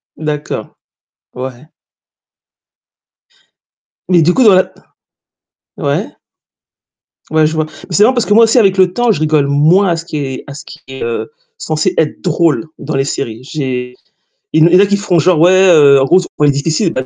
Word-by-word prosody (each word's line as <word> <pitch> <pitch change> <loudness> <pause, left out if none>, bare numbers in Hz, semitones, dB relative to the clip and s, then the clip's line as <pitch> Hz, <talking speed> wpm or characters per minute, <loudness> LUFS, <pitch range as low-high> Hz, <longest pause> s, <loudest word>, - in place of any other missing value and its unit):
D'accord, 150 -1 -6 0.6
ouais. 130 +1 -8 2.4
Mais 175 -2 +4
du 170 +3 +2
coup 260 - +2
dans 215 -4 +6
la 185 - +1 1.1
ouais. - - -2 1.2
Ouais, 155 0 +2
je 155 - -1
vois. 155 -1 -1
Mais 155 - -10
c'est 205 - +4
vrai, 245 +4 +3
parce 240 -3 -1
que 205 - +1
moi 230 +2 +6
aussi 225 +3 +1
avec 195 -5 +3
le 185 -1 +2
temps, 240 +1 +1
je 200 - -2
rigole 155 -2 +1
moins 160 +8 +2
à 170 - 0
ce 165 - -8
qui 155 - -6
est 135 -3 -5
à 140 - -9
ce 145 +1 -11
qui 155 - -13
est, 135 0 -8
heu, 115 0 -4 0.3
censé 155 - -2
être 155 - -1
drôle 170 -2 0
dans 145 +1 -5
les 135 - +1
séries. 115 -5 -5
J'ai 130 -3 -5 0.6
il 160 +1 +4
y 180 - +5
en - - +5
a 200 - +4
qui 200 0 0
feront, 195 -4 -1
genre: 175 +1 +2
«Ouais, 175 +3 +5 0.2
heu, 145 -4 +5
en - - +2
gros, 175 +7 +3
c'est 180 - -4
on 150 - +2
est 145 - +4
difficile» 160 +6 -1
155 Hz, 195 wpm, -13 LUFS, 140-185 Hz, 2.4 s, dans